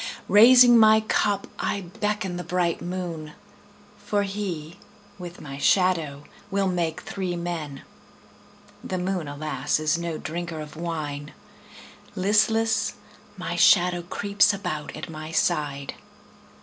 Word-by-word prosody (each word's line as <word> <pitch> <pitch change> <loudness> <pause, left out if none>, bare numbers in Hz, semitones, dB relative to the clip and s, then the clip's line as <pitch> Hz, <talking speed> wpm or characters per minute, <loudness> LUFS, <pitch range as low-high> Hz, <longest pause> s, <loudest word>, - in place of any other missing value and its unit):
Raising 240 +2 +8
my 220 0 +6
cup 205 -2 0
I 200 - -1
beckon 195 +1 -3
the 180 - -5
bright 175 -2 -1
moon, 175 -4 -5 0.7
For 205 0 -1
he, 185 -6 -5 0.4
with 175 -1 -8
my 140 -1 -8
shadow, 165 -6 +2 0.3
will 200 -1 0
make 170 -3 -1
three 185 -2 -4
men. 165 -5 -5 1.0
The 185 - -3
moon, 180 -3 -2
alas, 150 +2 -2
is 155 +2 +1
no 170 -2 -3
drinker 170 +1 -5
of 150 0 -8
wine; 155 -3 -5 0.8
Listless, 215 +2 +2 0.4
my - - -4
shadow 175 -2 +4
creeps 200 +3 +2
about 180 -7 -5
at 155 - -6
my 155 0 -8
side. 145 -5 -1
175 Hz, 120 wpm, -25 LUFS, 155-200 Hz, 1.0 s, Raising